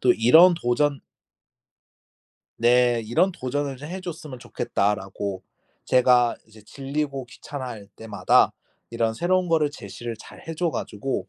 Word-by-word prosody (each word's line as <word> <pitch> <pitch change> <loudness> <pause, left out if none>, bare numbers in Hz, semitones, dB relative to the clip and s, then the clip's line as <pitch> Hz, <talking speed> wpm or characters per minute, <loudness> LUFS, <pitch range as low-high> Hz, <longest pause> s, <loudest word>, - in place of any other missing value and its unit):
또 125 - +5
이런 160 +11 +6
도전" 140 0 0 1.6
네. 120 0 +3
"이런 180 - +2
도전을 135 0 -3
좀 145 +3 -9
해 190 +2 -6
줬으면 155 -7 -8
좋겠다."라고 100 -3 -2 0.4
제가 125 -1 +4
이제 110 -1 -17
질리고 140 +1 -4
귀찮아할 125 -6 -8
때마다 110 -2 +2 0.4
이런 115 -1 -1
새로운 180 +5 +1
거를 155 -3 +2
제시를 115 -2 -8
잘 - - -13
해 165 - -4
줘 170 0 0
가지고 130 +2 -4
125 Hz, 270 characters per minute, -24 LUFS, 115-150 Hz, 1.6 s, 이런